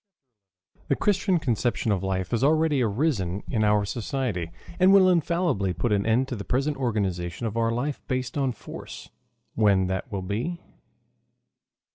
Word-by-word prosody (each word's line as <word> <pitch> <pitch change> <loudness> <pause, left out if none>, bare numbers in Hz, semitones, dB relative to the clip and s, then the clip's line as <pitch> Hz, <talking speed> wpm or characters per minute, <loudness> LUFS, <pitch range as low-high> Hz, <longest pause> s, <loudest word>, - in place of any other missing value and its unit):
THE 140 - +2
CHRISTIAN 195 0 +1
CONCEPTION 120 -4 0
OF 95 -3 0
LIFE 95 -1 -2
HAS 120 +1 0
ALREADY 155 -1 +3
ARISEN 105 - 0
IN 110 -2 +1
OUR 105 -1 +3
SOCIETY, 110 - -3 0.3
AND 185 +1 +6
WILL 195 -2 +7
INFALLIBLY 170 - +1
PUT 120 +5 -1
AN 100 0 +1
END 120 +4 +2
TO 130 - -4
THE 100 - -6
PRESENT 140 +6 0
ORGANIZATION 100 -6 -2
OF 110 -1 -3
OUR 115 0 +1
LIFE 135 +5 -2
BASED 130 -1 -2
ON 135 -3 +1
FORCE - - -10 0.4
WHEN 100 -4 +3
THAT 95 +7 -3
WILL 100 -2 -3
BE. 115 - -3
120 Hz, 155 wpm, -26 LUFS, 100-140 Hz, 0.4 s, WILL